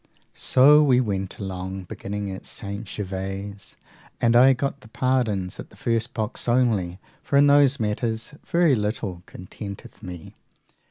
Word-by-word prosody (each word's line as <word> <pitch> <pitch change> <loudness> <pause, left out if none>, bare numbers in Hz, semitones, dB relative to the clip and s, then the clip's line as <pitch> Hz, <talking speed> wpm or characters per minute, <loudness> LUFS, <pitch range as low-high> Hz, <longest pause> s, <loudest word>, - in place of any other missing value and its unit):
So 145 +4 +6
we 130 -4 +4
went 95 -5 -2
along, 95 -1 -5
beginning 100 +2 -5
at 95 - -7
St. 100 +2 -5
Gervase, 95 0 -5 0.4
and 120 0 +3
I 130 +3 +7
got 140 +1 -3
the - - -14
pardons 110 -6 -1
at - - -8
the - - -19
first 115 +1 -1
box 110 +2 -3
only, 110 -8 +1 0.2
for 140 - +1
in 140 - +7
those 140 -1 +5
matters 110 +3 -2
very 170 -4 +3
little 105 -5 -2
contenteth 100 +2 -9
me. 90 -3 -9
110 Hz, 145 wpm, -24 LUFS, 95-125 Hz, 0.4 s, I